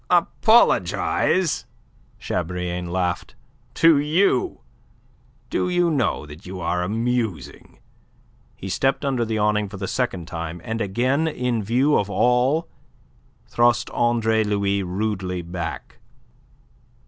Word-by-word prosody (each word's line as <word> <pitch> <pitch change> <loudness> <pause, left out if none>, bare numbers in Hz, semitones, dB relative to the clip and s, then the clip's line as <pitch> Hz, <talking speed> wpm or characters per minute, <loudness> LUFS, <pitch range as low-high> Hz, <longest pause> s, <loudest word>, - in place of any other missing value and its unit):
"Apologize?" 185 -2 +2 0.5
Chabrillane 90 0 -3
laughed. 90 -1 -2 0.4
"To 165 -3 +5
you! 185 - +1 0.9
Do 180 - 0
you 175 -1 +2
know 125 - 0
that 75 +2 -12
you 90 +1 -7
are 90 +1 -1
amusing?" 115 0 -3 0.8
He 95 - -8
stepped 135 +9 0
under 130 -4 0
the 110 -1 -2
awning 105 -1 +1
for 100 - -8
the 95 0 -4
second 95 -10 -2
time, 85 -1 -5
and 110 +1 -3
again 130 +10 +1
in 125 -6 -1
view 125 +8 +2
of 100 - -2
all 125 +9 +2 0.8
thrust 120 0 +2
Andre 110 -2 +2
Louis 100 -1 0
rudely 95 -1 -3
back. 85 0 -6
110 Hz, 110 wpm, -22 LUFS, 90-130 Hz, 0.9 s, To